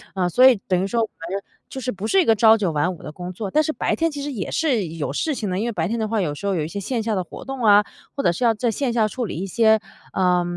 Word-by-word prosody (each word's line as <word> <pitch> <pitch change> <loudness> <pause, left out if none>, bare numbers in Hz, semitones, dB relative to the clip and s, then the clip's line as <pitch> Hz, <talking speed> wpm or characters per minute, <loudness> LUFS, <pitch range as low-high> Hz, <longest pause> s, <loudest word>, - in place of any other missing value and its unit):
呃 180 -2 +1
所 250 +8 +5
以 260 - +6
等 185 -1 +2
于 - - 0
说 230 +3 0
反 175 -6 -5
正 195 +1 -2 0.3
就 265 - -6
是 250 - -2
不 200 -1 -6
是 385 +10 +4
一 - - 0
个 225 - +4
朝 220 +1 +6
九 195 -6 0
晚 155 +4 0
五 170 - -13
的 150 - -7
工 180 +2 -6
作， 195 +2 -5
但 305 +9 +3
是 310 - -1
白 - - -1
天 330 0 0
其 290 -1 -6
实 290 - -4
也 210 -9 -4
是 260 - +1
有 155 -3 -4
事 310 - -1
情 220 -6 -3
的， 180 - -2
因 210 - -1
为 235 - -1
白 165 -5 -1
天 230 +4 -2
的 220 - -1
话 220 0 -1
有 150 -6 -1
时 200 - -8
候 200 - +1
有 160 -5 -1
一 - - -4
些 200 +5 -5
线 235 +4 -2
下 220 -1 -1
的 185 - -1
活 - - -11
动 270 -2 -5
啊， 205 -1 +7 0.3
或 280 - -1
者 - - +4
是 210 - -4
要 230 -2 +4
在 235 +2 -1
线 245 +3 -1
下 225 -2 +2
处 250 +4 -4
理 180 - -5
一 190 +3 -3
些， 220 +2 +4 0.3
呃 180 -2 +2
215 Hz, 360 characters per minute, -22 LUFS, 180-240 Hz, 0.3 s, 啊